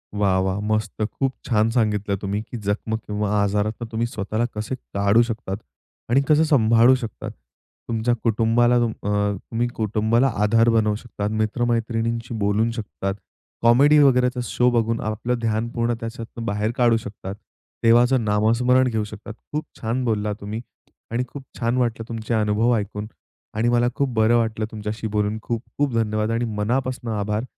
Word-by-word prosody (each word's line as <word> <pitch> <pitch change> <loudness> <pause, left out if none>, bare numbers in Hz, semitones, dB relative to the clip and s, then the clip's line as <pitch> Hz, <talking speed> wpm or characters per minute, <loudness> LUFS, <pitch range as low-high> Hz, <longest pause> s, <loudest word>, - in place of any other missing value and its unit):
वाह! 100 -2 +2
वाह! 95 +1 -1
मस्त. 110 0 -1
खूप 130 +5 -1
छान 110 -2 +2
सांगितलं 105 -4 +1
तुम्ही, 100 +2 -3
की 120 +2 -8
जखम 105 +1 -2
किंवा 105 -2 -3
आजारातून 105 +3 -1
तुम्ही 115 +1 0
स्वतःला 110 +1 -2
कसे 110 +5 -3
काढू 100 -2 +2
शकतात 115 -4 -3 0.5
आणि 130 +3 +4
कसं 155 +1 +5
सांभाळू 120 -4 +5
शकतात. 115 -5 -6 0.6
तुमच्या 115 +1 +1
कुटुंबाला 115 +2 +3
तुम 120 -1 +1
अ, 105 - -6 0.3
तुम्ही 115 +4 -2
कुटुंबाला 110 +3 +2 0.2
आधार 115 +2 +4
बनवू 110 -2 +2
शकतात, 105 -2 -4
मित्र-मैत्रिणींशी 115 +1 -1
बोलू 105 +3 +2
शकतात, 105 -4 -4 0.5
कॉमेडी 135 +6 +6
वगैरेचा 125 -2 +4
शो 125 0 +2
बघून 115 -1 +1
आपलं 110 +3 -2
ध्यान 115 0 -1
पूर्ण 120 0 0
त्याच्यातून 115 0 -7
बाहेर 105 0 -1
काढू 120 -2 +4
शकतात, 100 -2 -7 0.5
देवाचं 120 +2 +5
नामस्मरण 115 +5 +3
घेऊ 110 -2 -1
शकतात. 105 +1 -9 0.2
खूप 150 +1 -2 0.2
छान 120 +3 -1
बोललात 105 -2 0
तुम्ही 105 +3 -5 0.5
आणि 120 +2 0
खूप 140 +2 -9 0.2
छान 120 0 0
वाटलं 115 -3 0
तुमचे 115 0 -3
अनुभव 110 +2 +2
ऐकून 105 0 -4 0.5
आणि 115 +2 +2
मला 120 0 +3
खूप 140 -1 0
बरं 110 +1 +3
वाटलं 110 -1 0
तुमच्याशी 110 +1 -4
बोलून. 105 0 -1
खूप 115 +1 -3
खूप 145 -3 +1
धन्यवाद 110 -1 0
आणि 115 +1 0
मनापासून 120 +1 -1
आभार. 105 +1 -1
115 Hz, 155 wpm, -23 LUFS, 105-120 Hz, 0.6 s, कॉमेडी